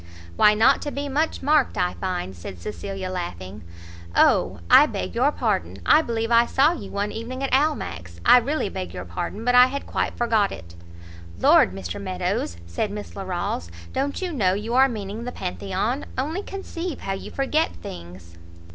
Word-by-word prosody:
"Why 210 - +5
not 240 +6 +4
to 290 - -4
be 285 +1 -4
much 300 +3 -1
marked, 290 -5 +3
I 180 -1 +1
find!" 180 - -4
said 85 +1 -9
Cecilia, 185 - -5
laughing. 100 - -6 0.5
"O, - - +3
I - - +8
beg 90 -1 -4
your - - +3
pardon! 85 +4 -1
I 300 - +6
believe 230 -4 -2
I 235 0 +5
saw 280 +4 +4
you 210 - -7
one 205 +1 -2
evening 250 +4 -5
at 270 - -2
Almack's; 175 - -1
I - - +8
really 280 +1 -1
beg 190 -1 -6
your 90 - -6
pardon, 195 - -5
but 245 - +3
I 250 0 +8
had 280 +2 -5
quite - - -2
forgot 225 -4 +2
it." 85 +1 -10 0.7
"Lord, - - +5
Mr 95 - -6
Meadows," 185 - -2
said 85 - -2
Miss 205 0 -7
Larolles, 175 - -3 0.2
"don't 280 +6 -2
you 360 -2 -3
know 190 -9 +2
you 215 +4 -4
are 265 +2 +5
meaning 210 -1 -5
the 250 - -4
Pantheon? 195 +6 -3
only 310 +9 -2
conceive 365 -5 -6
how 195 - -2
you 195 - -6
forget 300 +4 0
things!" 85 -1 -10
210 Hz, 180 wpm, -24 LUFS, 175-265 Hz, 0.7 s, I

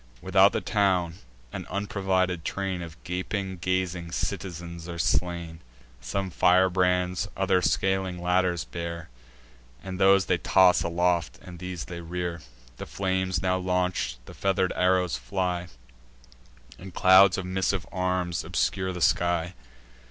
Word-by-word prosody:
Without - - +4
the - - -2
town, 90 -4 +1 0.3
an - - -6
unprovided 95 -3 -1
train 95 0 -3
Of 85 -1 -9
gaping, 95 +1 -3
gazing 90 -1 -2
citizens 85 -3 -5
are 85 - -5
slain. 85 -1 -1 0.4
Some 95 +10 -3
firebrands, 90 0 +2
others 90 -1 +2
scaling 95 -2 0
ladders 90 -1 +1
bear, 85 -1 -6 0.7
And 95 -1 -6
those 95 0 +5
they - - +1
toss 95 -1 +4
aloft, 85 -4 0
and 90 -1 -11
these 90 -2 -5
they 85 -1 -7
rear: 85 0 -4 0.4
The - - -7
flames 95 -2 -1
now 95 0 +2
launch'd, 90 -8 -1
the - - -11
feather'd 95 -1 0
arrows 90 -3 +2
fly, 90 +8 -2 1.1
And 95 -1 -11
clouds 95 0 +6
of 95 - -4
missive 95 -1 -1
arms 90 -2 -1
obscure 95 -1 -1
the 90 -1 -6
sky. 85 +2 +1
90 Hz, 130 wpm, -26 LUFS, 85-95 Hz, 1.1 s, clouds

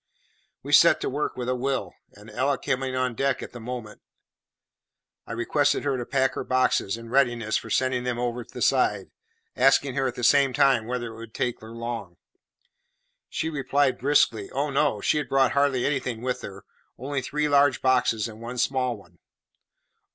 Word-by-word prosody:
We - - -4
set - - +7
to - - -1
work 145 +3 -2
with 125 -1 -4
a 125 - +1
will; 125 -7 -2 0.2
and 105 +2 -14
Ella 135 +1 0
coming 130 0 -2
on 130 -1 0
deck 135 +3 -1
at - - -8
the 120 - -9
moment, 120 -2 -7 1.3
I - - -8
requested 140 +5 +1
her 140 -2 0
to 120 -2 -4
pack 130 -1 +1
her - - -4
boxes 125 -5 +1
in 115 0 -11
readiness 120 -5 +1
for - - -2
sending 130 -1 0
them 125 -1 -2
over 120 0 -2
the - - -6
side, - - +1 0.4
asking 135 +1 +3
her, 135 0 0
at 125 - -4
the 125 - -6
same 140 +1 +4
time, 135 -5 +3
whether 120 -2 -4
it - - -12
would 115 -1 -11
take 125 -1 -2
her 110 - -11
long. 115 -6 -6 1.1
She 160 - -2
replied 140 -2 +1
briskly, 120 -6 +2
Oh, 140 +2 -2
no; 140 -6 +1
she 150 - +2
had 140 -5 -5
brought 135 -2 +3
hardly 140 -3 +1
anything 130 -5 -2
with 125 -1 -2
her 100 0 -9 0.3
only 135 +2 -3
three 150 +4 -1
large 145 -2 +4
boxes 125 -4 +2
and 110 0 -11
one 120 +2 -6
small 125 -1 0
one. 85 -4 -20
125 Hz, 185 wpm, -25 LUFS, 115-135 Hz, 1.3 s, set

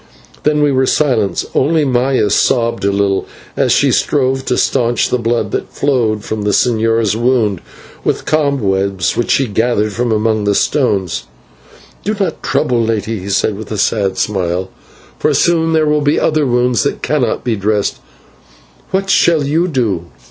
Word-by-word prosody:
Then 150 0 +1
we 145 - +3
were 130 -1 +1
silent, 115 - +1
only 155 +2 +2
Maya 125 -4 +1
sobbed 115 +1 +1
a 100 - +2
little 100 -1 0 0.3
as - - +1
she - - +3
strove 135 -2 +1
to - - 0
staunch 120 -3 +1
the 125 - 0
blood 115 0 -1
that - - -3
flowed 115 -7 0
from 110 -1 -4
the 105 - -1
señor's 115 -1 +1
wound 115 -5 +1 0.4
with - - -1
cobwebs 100 - 0
which 120 - -1
she 135 - +3
gathered 110 -1 0
from 120 +2 -1
among 110 -1 0
the 100 0 +1
stones. 95 - 0 0.8
"Do 210 +2 -1
not 185 -5 -2
trouble, 125 -6 0
lady," 110 -1 -2
he 95 +2 -7
said, 100 +1 +1
with 110 +1 -9
a 105 - -3
sad 100 -1 0
smile, 95 -2 -2 0.5
"for - - +1
soon 165 -1 +2
there 160 -1 +3
will 150 0 +1
be 145 +1 +2
other 155 -3 +1
wounds 125 0 +1
that 140 - -2
cannot 135 -7 0
be 120 -3 0
dressed. 105 0 -1 0.9
What 195 +1 -1
shall 170 -5 +3
you 160 +6 +1
do?" 110 - -1
115 Hz, 165 wpm, -15 LUFS, 105-140 Hz, 0.9 s, we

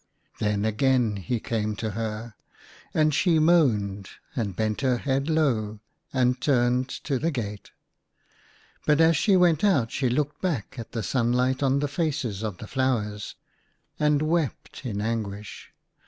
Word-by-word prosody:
Then 105 0 0
again 115 -1 +2
he 115 +5 -2
came 110 -1 -2
to 110 +1 -3
her. 110 +1 -4 0.6
And 155 -1 +2
she 170 +2 +3
moaned, 110 - +2 0.3
and 105 -7 -2
bent 110 +2 -1
her 130 -3 +2
head 135 +3 -1
low, 115 -10 +1 0.3
and 125 -1 +1
turned 125 -1 +2
to 135 -4 -1
the 165 - +1
gate. 105 -8 -5 1.2
But 150 0 +4
as 165 0 +5
she 195 +6 +4
went 175 -3 +3
out 140 - +3
she 130 - 0
looked 145 +4 -1
back 140 - -2
at 115 - -8
the 115 -3 -2
sunlight 125 +3 +1
on 135 0 +2
the 145 - +1
faces 140 - -2
of 105 -5 -3
the - - -8
flowers, 105 -5 -1 0.6
and 150 0 +3
wept 155 -4 -2
in 105 -3 -3
anguish. 105 -2 -4
125 Hz, 150 wpm, -26 LUFS, 110-145 Hz, 1.2 s, as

